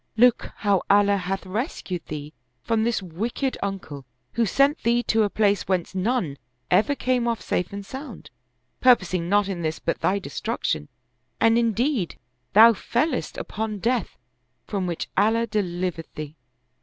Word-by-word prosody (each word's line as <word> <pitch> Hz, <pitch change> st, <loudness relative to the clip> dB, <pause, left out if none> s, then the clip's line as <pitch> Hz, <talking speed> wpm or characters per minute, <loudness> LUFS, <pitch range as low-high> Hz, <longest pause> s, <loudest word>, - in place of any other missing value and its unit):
Look 245 Hz, +1 st, +4 dB
how 200 Hz, -3 st, +2 dB
Allah 200 Hz, 0 st, +5 dB
hath 190 Hz, +1 st, -3 dB
rescued 185 Hz, -, -4 dB
thee 150 Hz, 0 st, -6 dB, 0.3 s
from 225 Hz, -1 st, +1 dB
this 230 Hz, -3 st, 0 dB
wicked 225 Hz, -, -2 dB
uncle, 190 Hz, -8 st, -5 dB, 0.3 s
who 230 Hz, -1 st, +1 dB
sent 275 Hz, -, +3 dB
thee 240 Hz, +1 st, +2 dB
to 225 Hz, -1 st, +2 dB
a 210 Hz, -, +2 dB
place 205 Hz, -1 st, +1 dB
whence 185 Hz, -2 st, -1 dB
none 185 Hz, -, -1 dB, 0.3 s
ever 215 Hz, +10 st, +4 dB
came 250 Hz, -3 st, 0 dB
off 230 Hz, -1 st, 0 dB
safe 175 Hz, -, -2 dB
and 200 Hz, 0 st, -6 dB
sound, 265 Hz, +8 st, -9 dB, 0.5 s
purposing 185 Hz, -8 st, +3 dB
not 205 Hz, 0 st, +3 dB
in 190 Hz, -3 st, -3 dB
this 155 Hz, -1 st, -1 dB
but -, -, -2 dB
thy 195 Hz, -, +2 dB
destruction; -, -, -3 dB, 0.5 s
and 225 Hz, 0 st, +5 dB
indeed 235 Hz, -, +1 dB, 0.4 s
thou 225 Hz, +3 st, +9 dB
fellest 250 Hz, +6 st, -1 dB
upon 215 Hz, -1 st, -4 dB
death 235 Hz, 0 st, -1 dB, 0.5 s
from 195 Hz, -3 st, -2 dB
which 170 Hz, -2 st, -3 dB
Allah 225 Hz, +3 st, +3 dB
delivered 180 Hz, -6 st, -2 dB
thee. 155 Hz, 0 st, -6 dB
205 Hz, 150 wpm, -24 LUFS, 185-235 Hz, 0.5 s, thou